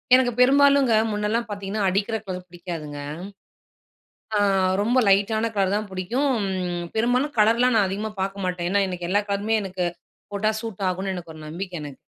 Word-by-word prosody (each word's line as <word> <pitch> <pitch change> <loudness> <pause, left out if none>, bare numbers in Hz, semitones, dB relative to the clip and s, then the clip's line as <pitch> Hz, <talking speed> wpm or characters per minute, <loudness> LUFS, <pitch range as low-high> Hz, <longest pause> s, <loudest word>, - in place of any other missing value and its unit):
எனக்கு 255 -1 +3
பெரும்பாலுங்க 275 -2 +5 0.2
முன்னல்லாம் 210 +3 -1
பார்த்தீங்கன்னா, 200 0 -3
அடிக்கிற 200 +4 0
கலர் 180 -1 -5
பிடிக்காதுங்க. 170 -4 -7 1.4
ஆ - - +2 0.4
ரொம்ப 240 +5 +3
லைட்டான 210 +3 +3
கலர் 195 -2 +2
தான் 210 0 -2
புடிக்கும். 230 +6 0 0.5
பெரும்பாலும் 250 +6 +1
கலர்லாம் 230 +4 +4
நான் 205 -3 +4
அதிகமா 205 +3 -3
பார்க்க 195 +1 -3
மாட்டேன். 180 -1 -2
ஏன்னா, 200 +2 +2
எனக்கு 180 -2 -4
எல்லா 205 +2 +3
கலருமே 205 +2 0
எனக்கு 185 -2 -3 0.5
போட்டா 210 +2 +1
சூட் 205 -4 -4
ஆகுன்னு, 190 +1 -2
எனக்கு 170 -2 -8
ஒரு 155 - -11
நம்பிக்கை 175 +2 -5
எனக்கு. 145 -2 -8
200 Hz, 155 wpm, -24 LUFS, 185-225 Hz, 1.4 s, பெரும்பாலுங்க